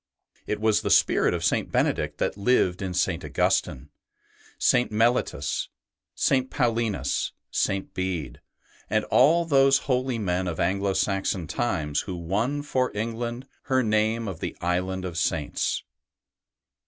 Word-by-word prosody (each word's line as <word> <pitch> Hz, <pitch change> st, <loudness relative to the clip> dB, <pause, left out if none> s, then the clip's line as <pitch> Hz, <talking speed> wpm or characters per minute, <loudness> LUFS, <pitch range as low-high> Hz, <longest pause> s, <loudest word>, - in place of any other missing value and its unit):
It 105 Hz, -, -2 dB
was 110 Hz, -1 st, +2 dB
the -, -, -2 dB
spirit -, -, +4 dB
of -, -, -2 dB
St. -, -, 0 dB
Benedict -, -, 0 dB
that -, -, -1 dB
lived 100 Hz, -4 st, +2 dB
in 95 Hz, -2 st, -3 dB
St. 90 Hz, -1 st, 0 dB
Augustine, 70 Hz, -1 st, 0 dB, 0.7 s
St. 125 Hz, -, +2 dB
Mellitus, 110 Hz, -, 0 dB, 0.5 s
St. 130 Hz, -1 st, +1 dB
Paulinus, 115 Hz, -3 st, -1 dB, 0.2 s
St. 95 Hz, 0 st, -1 dB
Bede, 95 Hz, -5 st, -3 dB, 0.5 s
and 110 Hz, 0 st, +1 dB
all 165 Hz, +6 st, +5 dB
those 135 Hz, -3 st, +5 dB
holy 130 Hz, -2 st, 0 dB
men 95 Hz, -3 st, -1 dB
of 85 Hz, -2 st, -4 dB
Anglo 100 Hz, +2 st, +1 dB
Saxon 95 Hz, -2 st, 0 dB
times 80 Hz, -9 st, -1 dB
who 95 Hz, -, -4 dB
won 105 Hz, -, -1 dB
for 130 Hz, -3 st, 0 dB
England 115 Hz, +3 st, -3 dB, 0.2 s
her 130 Hz, -1 st, +2 dB
name 110 Hz, +1 st, +1 dB
of 95 Hz, -5 st, -5 dB
the -, -, -5 dB
Island 90 Hz, +2 st, -1 dB
of 85 Hz, -2 st, -4 dB
Saints. 80 Hz, -3 st, -1 dB
105 Hz, 135 wpm, -25 LUFS, 90-120 Hz, 0.7 s, all